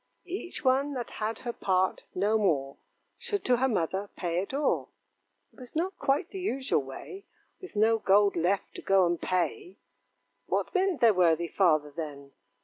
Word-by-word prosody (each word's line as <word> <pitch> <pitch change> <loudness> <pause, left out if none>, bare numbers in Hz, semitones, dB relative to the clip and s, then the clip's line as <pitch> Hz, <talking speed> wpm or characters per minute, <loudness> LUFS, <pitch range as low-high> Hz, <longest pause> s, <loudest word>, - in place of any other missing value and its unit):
'Each 355 -4 -6
one 270 +2 +2
that 245 -2 -5
had 220 +1 -1
her 240 - -2
part, 185 -3 0
no 205 +4 +2
more, 150 -10 +1 0.4
Should 405 -2 -3
to 250 -1 +4
her 265 +2 +2
mother 195 -2 -1
pay 175 -1 -1
it 195 - -6
o'er.' 285 +2 0 0.7
It - - -19
was 250 +2 -11
not 365 +4 -2
quite 280 +6 0
the 390 - -6
usual 270 - 0
way, 140 - -9 0.3
With 375 - -11
no 225 +2 +3
gold 200 0 +4
left, 180 +4 0
to - - -8
go 195 -1 +4
and 170 -1 -1
pay: 365 - -2 0.7
What - - -1
meant 375 -4 +1
their 230 -2 +6
worthy 170 -2 +3
father, 155 -6 +2
then? 145 -4 -7
210 Hz, 170 wpm, -29 LUFS, 175-280 Hz, 0.7 s, their